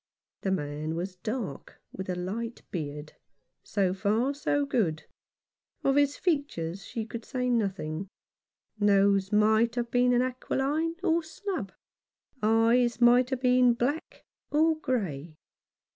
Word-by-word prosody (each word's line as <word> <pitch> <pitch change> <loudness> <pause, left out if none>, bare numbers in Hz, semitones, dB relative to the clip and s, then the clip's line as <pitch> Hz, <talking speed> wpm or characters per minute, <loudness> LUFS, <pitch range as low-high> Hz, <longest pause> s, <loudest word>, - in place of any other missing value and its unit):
The 195 - -1
man 155 -2 -2
was 180 +2 -4
dark, 215 - -5
with 190 0 -7
a 180 - -1
light 220 +6 -4
beard. 150 -2 -5 0.5
So 190 -3 0
far, 215 +8 +1
so 290 0 0
good. 185 - 0 0.8
Of 275 - +3
his 285 0 +3
features 200 - -1
she 225 -2 -5
could 230 +1 -7
say 250 0 -2
nothing; 195 -6 -1 0.7
nose 200 -1 +3
might 220 +2 +3
have 235 -1 -2
been 245 0 +3
aquiline 270 +5 -1
or 335 -2 +3
snub, 325 - -5 0.7
eyes 230 +3 +3
might 245 +1 +5
have 260 -2 -2
been 250 -1 +4
black 270 +7 -2 0.3
or 315 +2 +3
grey. 175 - -2
230 Hz, 125 wpm, -28 LUFS, 190-255 Hz, 0.8 s, might